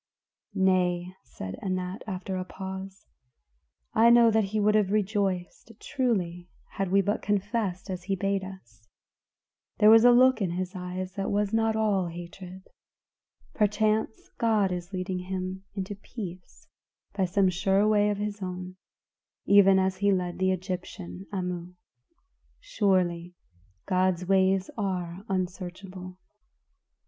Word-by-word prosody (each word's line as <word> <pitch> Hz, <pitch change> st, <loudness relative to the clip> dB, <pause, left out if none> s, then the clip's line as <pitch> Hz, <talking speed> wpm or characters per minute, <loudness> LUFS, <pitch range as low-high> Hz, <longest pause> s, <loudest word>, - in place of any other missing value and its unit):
"Nay," 180 Hz, -2 st, +1 dB
said 95 Hz, -6 st, -8 dB
Anat, 185 Hz, 0 st, -3 dB
after 190 Hz, -1 st, -4 dB
a 185 Hz, -, -2 dB
pause, 190 Hz, +1 st, -8 dB, 0.9 s
"I 230 Hz, +1 st, +6 dB
know 235 Hz, -1 st, +7 dB
that 220 Hz, -1 st, +2 dB
he 215 Hz, +2 st, -2 dB
would 210 Hz, 0 st, +3 dB
have 210 Hz, -3 st, +3 dB
rejoiced 200 Hz, -1 st, -1 dB
truly 180 Hz, -9 st, -2 dB, 0.2 s
had 195 Hz, -1 st, -2 dB
we 195 Hz, +1 st, +5 dB
but 205 Hz, +3 st, -1 dB
confessed 205 Hz, -2 st, -1 dB
as 185 Hz, -2 st, -5 dB
he 195 Hz, 0 st, 0 dB
bade 195 Hz, 0 st, -1 dB
us; 190 Hz, -, -11 dB, 1.0 s
there 210 Hz, +1 st, +7 dB
was 225 Hz, 0 st, +8 dB
a 245 Hz, -, +8 dB
look 255 Hz, -1 st, +5 dB
in 180 Hz, -3 st, 0 dB
his 185 Hz, +2 st, -4 dB
eyes 185 Hz, +1 st, -5 dB
that 195 Hz, 0 st, -3 dB
was 205 Hz, +1 st, 0 dB
not 225 Hz, 0 st, +2 dB
all 205 Hz, -4 st, +1 dB
hatred; 175 Hz, +2 st, -9 dB, 0.9 s
perchance 215 Hz, +1 st, 0 dB
God 215 Hz, -4 st, +2 dB
is 175 Hz, 0 st, -5 dB
leading 185 Hz, -1 st, -3 dB
him 185 Hz, +1 st, -5 dB
into 195 Hz, 0 st, -4 dB
peace 195 Hz, -3 st, -9 dB, 0.5 s
by 190 Hz, -, +1 dB
some 190 Hz, +1 st, +2 dB
sure 195 Hz, +3 st, +2 dB
way 210 Hz, -1 st, +3 dB
of 205 Hz, -, -1 dB
his 210 Hz, 0 st, -4 dB
own, 185 Hz, 0 st, -6 dB, 0.7 s
even 195 Hz, -1 st, +6 dB
as 190 Hz, 0 st, +1 dB
he 200 Hz, +1 st, +2 dB
led 180 Hz, -2 st, -1 dB
the 190 Hz, 0 st, +2 dB
Egyptian, 185 Hz, 0 st, -5 dB
Amu. 180 Hz, -2 st, -4 dB, 0.8 s
Surely, 185 Hz, -, 0 dB, 0.5 s
God's 185 Hz, -1 st, +1 dB
ways 190 Hz, 0 st, +2 dB
are 185 Hz, -2 st, -3 dB
unsearchable." 185 Hz, 0 st, -5 dB
190 Hz, 135 wpm, -27 LUFS, 180-205 Hz, 1.0 s, was